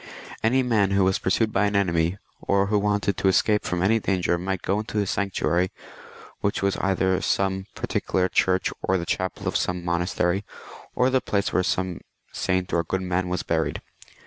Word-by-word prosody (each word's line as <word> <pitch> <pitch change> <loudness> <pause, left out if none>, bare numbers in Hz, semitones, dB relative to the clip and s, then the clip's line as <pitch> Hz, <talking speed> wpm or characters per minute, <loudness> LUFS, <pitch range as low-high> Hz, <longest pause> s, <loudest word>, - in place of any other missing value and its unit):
Any 130 +4 +3
man 110 -6 +2
who 100 0 +3
was 95 0 +2
pursued 110 +3 +1
by 105 +2 +3
an 100 - -2
enemy, 85 -2 +1 0.2
or 100 0 +2
who 105 +1 +1
wanted 105 0 0
to - - +1
escape 105 +2 +3
from 90 0 -1
any 110 +4 +3
danger, 90 -4 0
might 95 0 -3
go 100 +2 0
into 110 0 -5
a 105 - +2
sanctuary, 95 -2 0 0.7
which 100 -1 -1
was 100 0 +2
either 95 -1 +1
some 95 0 0
particular 90 -1 0
church 95 0 +1
or 95 - +1
the 85 - -4
chapel 95 +2 -3
of - - -1
some 90 -1 -1
mon 85 0 +1
astery, 90 +1 0 0.5
or 125 +1 +3
the 130 0 +2
place 100 -1 -1
where - - +3
some 90 -1 -1 0.3
saint 95 -1 -1
or 85 - +2
good 95 +3 -2
man 90 0 -1
was 90 -1 -2
buried. - - -1
95 Hz, 190 wpm, -24 LUFS, 90-100 Hz, 0.7 s, Any